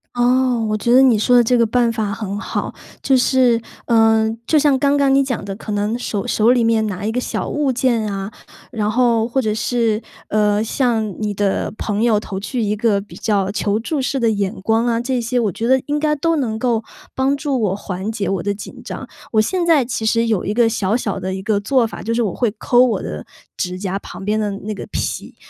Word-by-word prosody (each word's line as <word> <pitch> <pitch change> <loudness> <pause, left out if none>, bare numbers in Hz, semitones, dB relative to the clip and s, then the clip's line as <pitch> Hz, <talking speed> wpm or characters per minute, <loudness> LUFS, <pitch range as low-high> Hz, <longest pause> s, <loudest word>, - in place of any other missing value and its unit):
哦， 245 -1 +2
我 215 - 0
觉 215 +3 0
得 255 +2 +7
你 255 -4 +5
说 245 +4 +4
的 240 - +6
这 245 +2 +2
个 235 - +4
办 235 +1 +2
法 215 -2 -2
很 200 -1 -4
好。 - - -4 0.3
就 270 - +3
是 250 -2 +3 0.2
呃， 225 -1 +4 0.2
就 315 - +3
像 290 -2 +4
刚 280 +1 +2
刚 275 -1 +3
你 275 0 +4
讲 250 -6 -3
的， 195 -1 -5
可 215 +1 -7
能 205 +3 -1
手 205 -5 -3
手 225 +2 +3
里 245 -2 +3
面 225 -1 +2
拿 200 -1 -4
一 220 - 0
个 245 - -1
小 - - -3
物 295 -2 0
件 235 -4 0
啊， 195 +1 -4 0.4
然 210 -3 -1
后， 230 -1 +2
或 250 +3 -1
者 215 -3 0
是， 220 +1 0 0.3
呃， 210 0 +2
向 225 -4 0
你 210 -1 -1
的 200 0 0
朋 210 -1 -2
友 225 -3 +3
投 195 -2 -6
去 235 +5 -3
一 210 0 0
个 210 -1 +1
比 205 +1 -11
较 200 -3 0
求 205 0 0
助 280 +5 -2
式 265 +1 -1
的 230 -2 +2
眼 200 -1 -1
光 225 +4 +1
啊 230 -1 +1
这 250 +1 -1
些， 245 +2 -1
我 220 -4 +1
觉 225 +6 -3
得 260 +1 +4
应 295 +2 -1
该 300 0 +1
都 330 +3 0
能 240 -7 -1
够， 230 -1 0 0.3
帮 265 +1 +1
助 280 -2 -1
我 195 -3 +1
缓 195 +1 -4
解 210 -3 -3
我 195 -3 -1
的 205 - 0
紧 205 - -10
张。 - - -7 0.3
我 215 - +5
现 355 - -1
在 305 -6 +4
其 235 -2 -3
实 230 +1 +2
有 215 -5 0
一 205 - -2
个 235 +1 +3
小 220 -1 0
小 200 -5 -3
的 190 0 -3
一 190 - -6
个 210 0 +1
做 250 +4 +2
法， 225 - -7
就 230 - -2
是 235 - +1
我 200 -5 -1
会 240 - +1
抠 245 +4 +4
我 230 -7 +1
的 75 - -5 0.3
指 180 0 -3
甲 190 0 -3
旁 195 - -9
边 210 +1 +1
的 210 -1 0
那 200 +2 -5
个 200 - -7
皮， - - -4
225 Hz, 255 characters per minute, -19 LUFS, 205-250 Hz, 0.4 s, 得